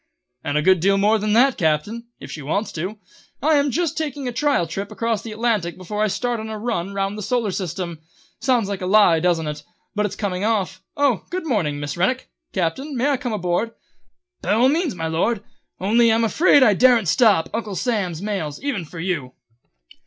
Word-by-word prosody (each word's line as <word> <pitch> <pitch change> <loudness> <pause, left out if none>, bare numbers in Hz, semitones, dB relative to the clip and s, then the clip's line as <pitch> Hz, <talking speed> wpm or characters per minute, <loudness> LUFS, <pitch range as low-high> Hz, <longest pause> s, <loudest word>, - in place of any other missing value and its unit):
"And 145 - -1
a 150 - +1
good 185 +1 +5
deal 195 +4 +3
more 210 +2 +3
than 210 0 0
that, 250 +3 +4
Captain, 175 +9 0
if - - -9
she 155 - -6
wants 180 +10 -2
to. 185 +7 -4 0.4
I 315 +3 +2
am 285 0 +2
just 330 +2 -1
taking 290 -4 -3
a - - -1
trial 275 - +1
trip 195 +5 -5
across 230 -2 -1
the 225 - -8
Atlantic 215 -6 -1
before 195 +3 -4
I 215 - +3
start 240 +3 -1
on 220 0 -6
a 220 - -4
run 210 -5 -2
round 195 +1 -2
the - - -5
Solar 230 -1 0
System. 175 -3 -4 0.4
Sounds 245 -6 +2
like 200 -2 -4
a 180 - -2
lie, 190 -5 +5
doesn't 170 -1 +1
it? 150 0 -4 0.3
But 210 -1 +1
it's - - -8
coming 190 -2 -2
off. 210 -4 0 0.2
Oh, 280 -7 +2
good 365 -1 -4
morning, 175 - 0
Miss 145 +1 -4
Rennick! 250 +9 0 0.2
Captain, 255 - -2
may 270 +4 +2
I 275 - +1
come 245 -1 -4
on 210 - -3
board?" 180 +6 -1 0.7
"By - - 0
all 240 +4 +4
means, 315 - 0
my 165 -2 -4
Lord, 195 +7 0 0.4
only 230 +4 +4
I'm 225 +1 +2
afraid 285 +4 +5
I 215 -5 +6
daren't 240 -2 +4
stop 205 -3 +4
Uncle 215 -3 -3
Sam's 195 -7 -1
mails, 185 -9 -3
even 245 -12 -2
for 165 +2 -10
you." 165 -8 -3
210 Hz, 210 wpm, -22 LUFS, 180-240 Hz, 0.7 s, I